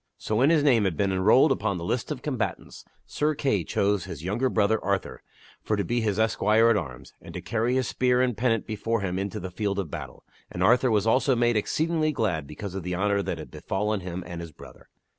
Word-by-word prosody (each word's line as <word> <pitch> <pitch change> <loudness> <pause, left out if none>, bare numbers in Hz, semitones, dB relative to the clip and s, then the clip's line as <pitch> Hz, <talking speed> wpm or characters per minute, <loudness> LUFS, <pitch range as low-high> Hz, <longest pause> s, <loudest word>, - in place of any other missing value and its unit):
So, 110 - -2
when 135 +5 +4
his 160 -3 +3
name 120 -8 +4
had 90 -5 -1
been 100 -1 +1
enrolled 105 +10 +4
upon 100 -2 0
the 85 - -6
list 120 +8 -2
of 135 -4 -5
combatants, 130 -7 -4 0.2
Sir 150 +1 -1
Kay 120 - 0
chose 100 +2 0
his 80 -5 -8
young 100 +6 -2
brother 110 -4 +1
Arthur 100 -1 -2 0.4
for 110 - -1
to 100 - -1
be 120 +3 -1
his 105 -3 0
esquire 110 +1 +3
at - - +3
arms 65 -11 -5
and - - -11
to - - -3
carry 115 +2 -1
his 130 -2 +1
spear 125 -1 +2
and 125 -2 +1
pennant 115 0 0
before 115 0 -2
him 95 -1 -2
into 100 -1 -3
the 95 0 -6
field 100 +1 -2
of 95 -6 -3
battle, - - -8 0.3
and 90 - -2
Arthur 125 +5 +4
was 105 -2 +2
also 130 +3 +3
made 120 0 +2
exceedingly 155 +8 0
glad 90 - -1
because 90 +6 -7
of 95 - -4
the 90 +1 -3
honor 100 +2 +1
that 90 - -3
had 80 - -9
befallen 105 +2 -2
him 90 0 -6
and 85 -1 -7
his 85 -1 -8
brother. - - -15
105 Hz, 230 wpm, -26 LUFS, 95-120 Hz, 0.4 s, when